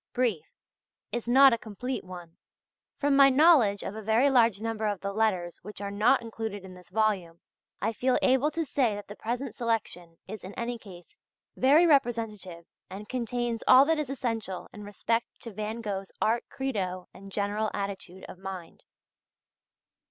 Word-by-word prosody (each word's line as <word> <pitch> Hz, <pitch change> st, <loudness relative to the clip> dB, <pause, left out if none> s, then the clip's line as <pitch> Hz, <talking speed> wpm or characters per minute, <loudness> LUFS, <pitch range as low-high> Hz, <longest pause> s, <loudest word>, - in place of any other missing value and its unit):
Briefe," 235 Hz, -10 st, -1 dB, 0.6 s
is 240 Hz, -1 st, -4 dB
not 265 Hz, +2 st, +7 dB
a 230 Hz, -, -1 dB
complete 245 Hz, +5 st, -5 dB
one, 175 Hz, -3 st, -10 dB, 0.6 s
from 285 Hz, -1 st, +2 dB
my 275 Hz, 0 st, +8 dB
knowledge 265 Hz, -, +5 dB
of 200 Hz, -, -5 dB
a 220 Hz, -, -6 dB
very 225 Hz, +6 st, +3 dB
large 230 Hz, -6 st, +4 dB
number 220 Hz, -1 st, -2 dB
of 205 Hz, -2 st, -2 dB
the 200 Hz, 0 st, -3 dB
letters 190 Hz, -5 st, 0 dB
which 210 Hz, +2 st, -10 dB
are 200 Hz, 0 st, -4 dB
not 230 Hz, +5 st, +3 dB
included 220 Hz, -3 st, -6 dB
in 185 Hz, -, -10 dB
this 180 Hz, -1 st, -15 dB
volume, 190 Hz, -5 st, 0 dB, 0.4 s
I 220 Hz, +2 st, 0 dB
feel 255 Hz, +3 st, +1 dB
able 265 Hz, +3 st, +3 dB
to 325 Hz, +1 st, -3 dB
say 260 Hz, -6 st, +1 dB
that 205 Hz, -1 st, -8 dB
the 205 Hz, -, -9 dB
present 240 Hz, +2 st, -4 dB
selection 200 Hz, -8 st, -3 dB
is 215 Hz, +1 st, -8 dB
in 190 Hz, +2 st, -9 dB
any 235 Hz, 0 st, -3 dB
case 195 Hz, -, -14 dB, 0.4 s
very 290 Hz, +6 st, +5 dB
representative 225 Hz, -, 0 dB, 0.2 s
and 200 Hz, +3 st, -8 dB
contains 240 Hz, -1 st, -2 dB
all 260 Hz, +2 st, +8 dB
that 320 Hz, +1 st, +1 dB
is 295 Hz, -4 st, -3 dB
essential 225 Hz, -8 st, -3 dB
in 210 Hz, -, -9 dB
respect 230 Hz, +3 st, -1 dB
to 230 Hz, -, -7 dB
Van 215 Hz, +3 st, -4 dB
Gogh's 195 Hz, -3 st, -4 dB
art 230 Hz, +2 st, +1 dB
credo 190 Hz, -9 st, -3 dB
and 195 Hz, +1 st, -12 dB
general 205 Hz, +2 st, -1 dB
attitude 195 Hz, -2 st, -5 dB
of 185 Hz, -, -11 dB
mind. 190 Hz, -3 st, -8 dB
220 Hz, 170 wpm, -28 LUFS, 195-245 Hz, 0.6 s, my